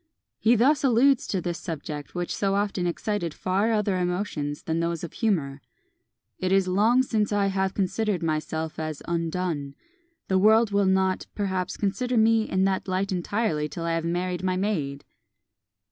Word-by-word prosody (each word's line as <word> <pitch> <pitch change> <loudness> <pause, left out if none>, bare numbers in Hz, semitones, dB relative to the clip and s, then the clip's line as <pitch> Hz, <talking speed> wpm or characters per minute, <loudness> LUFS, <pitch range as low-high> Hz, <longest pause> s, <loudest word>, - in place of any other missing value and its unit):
He 230 +2 +4
thus 265 +6 +3
alludes 265 +1 +4
to 190 - -1
this 175 -1 -3
subject, 150 -2 -6
which 175 0 -2
so 195 -1 0
often 200 -3 0
excited 175 -2 -2
far 195 +5 0
other 210 -4 +1
emotions 175 -5 -2
than 160 0 -1
those 170 0 -2
of 170 - -6
humour: 150 -11 -1 0.8
"It 185 0 -1
is 195 -1 +3
long 220 +7 +3
since 215 -5 0
I 205 -1 +2
have 190 -1 0
considered 200 -1 0
myself 160 0 -2
as 155 -2 -4
undone. 165 -4 -2 0.5
The 190 -1 +2
world 220 +2 +5
will 200 -1 +2
not, 190 0 +1
perhaps, 190 -3 -2
consider 235 +5 -1
me 225 0 +3
in 190 0 +1
that 195 +1 0
light 190 +2 -1
entirely 175 -4 -1
till 170 - -6
I 165 0 0
have 165 0 -1
married 175 +1 -2
my 185 0 0
maid!" 155 -9 -2
185 Hz, 165 wpm, -26 LUFS, 170-210 Hz, 0.8 s, world